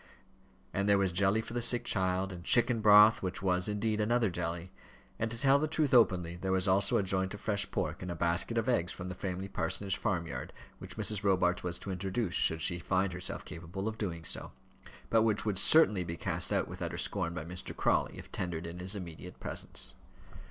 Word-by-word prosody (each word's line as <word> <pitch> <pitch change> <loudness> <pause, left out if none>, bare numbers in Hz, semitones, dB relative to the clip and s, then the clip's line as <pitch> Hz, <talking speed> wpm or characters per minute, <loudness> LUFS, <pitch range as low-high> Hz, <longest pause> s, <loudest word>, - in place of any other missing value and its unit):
And 100 +1 0
there 100 - +5
was 95 -2 +1
jelly 100 +4 +2
for 115 - -9
the 120 - -1
sick 120 0 +3
child, 95 -1 +1
and 90 -1 -8
chicken 120 +2 +3
broth, 105 +1 +7
which 95 0 -4
was, 90 -1 +1
indeed, 105 +1 -1
another 115 -1 +1
jelly; 85 +1 -4 0.5
and, 110 - -1
to 115 - -6
tell 135 +3 +4
the 155 - 0
truth 155 -3 0
openly, 90 -8 +3
there 95 +2 -3
was 95 +1 +2
also 95 +1 +3
a - - +1
joint 95 +1 0
of - - -10
fresh 100 -2 -1
pork - - -3
and 90 - -5
a 85 - -3
basket 85 +7 +1
of 115 +1 0
eggs 90 -8 +1
from 90 0 -7
the - - -4
Framley 95 +1 -4
Parsonage 95 +2 -2
farmyard, 85 -6 -3 0.3
which - - -10
Mrs. 105 -2 +1
Robarts 90 -2 +2
was 90 -1 -2
to 95 +2 -6
introduce, 95 +1 -2
should 80 -1 +1
she 85 - +1
find 95 +1 0
herself 90 0 -4
capable 85 +5 -6
of 110 0 -4
doing 85 -6 -4
so; - - -4 0.6
but 115 - +5
which 110 -2 +1
would 100 -3 0
certainly 105 - +5
be 85 -1 -5
cast - - -1
out - - +1
with - - -9
utter - - -3
scorn 85 +1 -1
by 80 - -5
Mr. 90 +2 -5
Crawley, - - +1
if - - -11
tendered 85 -2 -4
in 85 +1 -7
his 95 +3 -3
immediate 85 -5 -8
presence. - - -3
95 Hz, 215 wpm, -31 LUFS, 90-105 Hz, 0.6 s, broth